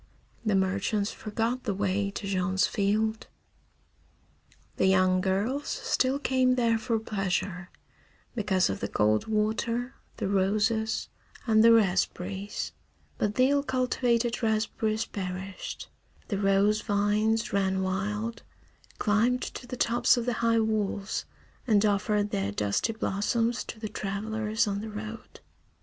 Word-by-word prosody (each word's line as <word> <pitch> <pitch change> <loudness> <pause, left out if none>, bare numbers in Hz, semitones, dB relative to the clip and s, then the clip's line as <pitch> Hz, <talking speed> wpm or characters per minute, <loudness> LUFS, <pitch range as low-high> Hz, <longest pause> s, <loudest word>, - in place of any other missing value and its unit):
The 215 -3 +1
merchants 200 +2 0
forgot 230 +4 -3
the 205 -4 -1
way 200 0 0
to 200 - -6
Jean's 190 -1 +1
field. 215 +2 0 1.5
The 190 - +3
young 185 -1 +4
girls 205 +10 -1
still 260 +1 0
came 260 -2 +2
there 230 -2 +2
for 230 0 0
pleasure, 195 -3 -2 0.6
because 200 -5 +1
of 95 - -3
the 100 - -2
cold 105 +1 +1
water, 225 +3 0 0.2
the - - -2
roses, 215 +3 +1 0.4
and 220 -2 +4
the 230 - +8
raspberries; 195 -1 0 0.5
but 210 0 0
the 255 +2 +4
ill 285 0 +3
cultivated 250 -3 0
raspberries 220 0 0
perished, 190 0 -6 0.4
the 200 -4 -1
rose 200 +2 +3
vines 215 +2 +1
ran 190 -1 +1
wild, 210 +5 -2 0.6
climbed 230 +4 +2
to 245 - -7
the 250 - -6
tops 240 +2 +3
of 240 - -1
the 245 - 0
high 230 -1 +3
walls, 215 -2 -1 0.4
and 215 -2 +4
offered 205 0 +1
their 100 0 -1
dusty 105 - 0
blossoms 225 +3 0
to 220 - -8
the 215 - -4
travellers 215 +2 -1
on 200 -1 -2
the 220 - -6
road. 215 +1 -8
215 Hz, 130 wpm, -28 LUFS, 195-230 Hz, 1.5 s, the